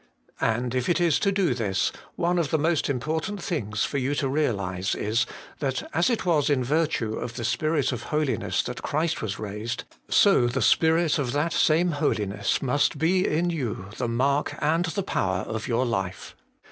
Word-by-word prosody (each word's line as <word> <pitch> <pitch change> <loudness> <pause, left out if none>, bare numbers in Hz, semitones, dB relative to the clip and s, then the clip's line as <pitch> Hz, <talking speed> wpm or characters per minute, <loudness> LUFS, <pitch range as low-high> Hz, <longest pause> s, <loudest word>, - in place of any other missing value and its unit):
And 120 +2 0
if 125 -1 -1
it 175 - +2
is 170 -3 +3
to 200 - +2
do 190 -8 +2
this, 100 -6 0 0.2
one 175 +1 +1
of 160 -5 0
the 160 - +2
most 160 0 +1
important 160 - -2
things 110 - -2
for 140 - -2
you 135 +3 -1
to 140 - 0
realize 100 -10 -1
is, 115 +3 0 0.3
that 135 -2 -2
as 165 - +3
it 235 -5 -1
was 155 -5 +2
in 135 -3 +2
virtue 145 -5 0
of 120 +1 -5
the 120 - -4
Spirit 155 +5 +1
of 120 -2 -4
holiness 150 -3 0
that 125 0 -5
Christ 155 +2 -1
was 100 -2 -3
raised, 105 +2 -4 0.3
so 195 -12 +5
the 120 +3 -1
Spirit 160 -1 +3
of 130 -3 -1
that 150 +3 0
same 170 +3 +3
holiness 105 -9 0
must 145 +3 +1
be 180 +5 +2
in 175 +3 +1
you 115 - -4
the 125 - -1
mark 135 +5 +1
and 165 +4 +2
the 195 +4 -2
power 95 - -1
of 110 0 -4
your 120 +1 +1
life. 95 -6 -3
140 Hz, 185 wpm, -26 LUFS, 115-160 Hz, 0.3 s, so